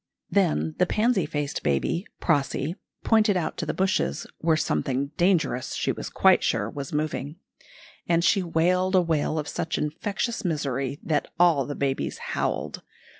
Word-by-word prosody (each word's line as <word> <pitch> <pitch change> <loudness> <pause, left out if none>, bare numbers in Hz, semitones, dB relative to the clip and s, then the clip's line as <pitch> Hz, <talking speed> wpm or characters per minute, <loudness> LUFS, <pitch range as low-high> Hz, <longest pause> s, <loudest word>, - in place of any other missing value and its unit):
Then 75 +2 +2
the 180 - +4
pansy 215 -6 +2
faced 145 -1 -3
baby, 70 - 0
Prâsie, 145 -1 0 0.3
pointed 215 -3 +4
out 170 - -2
to - - -3
the - - 0
bushes, 190 0 0
where 160 -1 +2
something 140 -2 -1
dangerous, 175 -8 +1
she - - 0
was - - -5
quite - - +4
sure, 105 - +1
was 140 +3 -6
moving; 150 -1 -2 0.7
and 170 0 +3
she 195 +1 +4
wailed 180 +2 +1
a 185 - +6
wail 160 -1 0
of 150 -1 -2
such 160 - -2
infectious 200 +9 -2
misery 140 -5 -2
that 155 -2 0
all 160 -7 +4
the 145 - -4
babies 135 -1 -1 0.2
howled. - - -2
155 Hz, 155 wpm, -26 LUFS, 140-180 Hz, 0.7 s, a